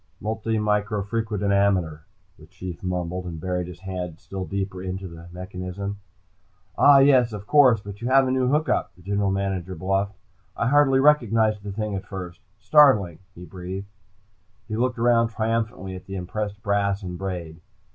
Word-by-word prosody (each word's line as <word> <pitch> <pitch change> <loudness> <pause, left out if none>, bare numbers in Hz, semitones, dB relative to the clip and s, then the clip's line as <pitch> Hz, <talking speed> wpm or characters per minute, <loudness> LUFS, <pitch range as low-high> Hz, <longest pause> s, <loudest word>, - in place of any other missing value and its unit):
"Multimicrofrequidometer," 105 -4 0 0.4
the 80 - -15
Chief 95 -1 -8
mumbled, 90 0 -3
and 85 -2 -6
buried 90 +1 -2
his 90 -1 -11
head 90 -4 -5
still 95 -1 -6
deeper 95 -1 -4
into 95 +1 -5
the 85 0 -11
mechanism. 95 +2 -6 0.8
"Ah 145 -1 +7
yes, 135 -4 +5
of 105 -1 -7
course. 130 -5 +5
But 100 +1 -9
you 120 - -2
have 135 +1 +5
a - - 0
new 130 -1 +1
hook 150 +4 +1
up," - - -1
the 90 - -19
General 100 +1 0
Manager 95 -2 -2
bluffed. 95 +3 -1 0.4
"I 115 - +1
hardly 140 -1 +4
recognized 115 -7 +3
it 100 0 -6
at 100 -3 -3
first. 90 -3 -7 0.2
Startling!" 105 - +4 0.2
he 90 - -10
breathed. 95 +3 -7 0.8
He 110 - -3
looked 125 +2 0
around 115 0 +3
triumphantly 115 -3 -2
at 90 - -11
the 95 - -6
impressed 100 +3 -4
brass 100 0 0
and 90 -1 -5
braid. 85 -4 -5
100 Hz, 155 wpm, -24 LUFS, 90-110 Hz, 0.8 s, Ah